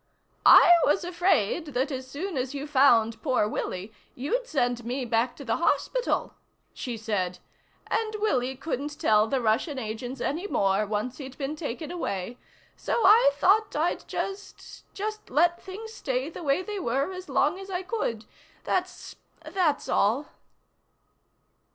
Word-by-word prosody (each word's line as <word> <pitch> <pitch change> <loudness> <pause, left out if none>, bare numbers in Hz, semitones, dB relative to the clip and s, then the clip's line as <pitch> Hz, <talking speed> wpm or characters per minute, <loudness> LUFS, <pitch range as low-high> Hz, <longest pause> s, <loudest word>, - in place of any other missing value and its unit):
"I 350 - +9
was 365 +5 +2
afraid 345 - 0
that 265 +4 0
as 260 -1 -5
soon 340 +6 -5
as 260 +1 -2
you 280 +1 -4
found 235 -6 +4
poor 235 -3 +1
Willie 200 0 -4 0.2
you'd 470 - -2
send 245 - 0
me 250 +3 -3
back 235 +1 0
to 280 - -10
the 225 - 0
hospital," 485 +8 0 0.4
she 240 -3 -5
said. 200 -5 -2 0.5
"And 435 -1 -1
Willie 265 - 0
couldn't 290 +1 -4
tell 220 -8 +4
the 270 +3 0
Russian 240 +6 0
agents 245 +2 -5
any 330 +10 -2
more 195 - +1
once 215 +5 -3
he'd 265 -2 -8
been 285 +1 -3
taken 300 0 -5
away. 235 - -4 0.4
So 465 - -1
I 415 -5 +7
thought 410 +7 +3
I'd 315 +4 -1
just 395 +1 -6
just 430 +1 -5
let 345 +5 +2
things 435 +4 -8
stay 265 - -2
the - - -8
way 295 +3 +1
they 415 0 -5
were 275 +3 -1
as 370 0 -8
long 370 - +1
as 390 0 -9
I 370 -1 -3
could. 300 - -3 0.4
That's 365 0 -3 0.3
that's 320 -3 0
all." 235 +9 +1
280 Hz, 150 wpm, -27 LUFS, 240-360 Hz, 0.5 s, I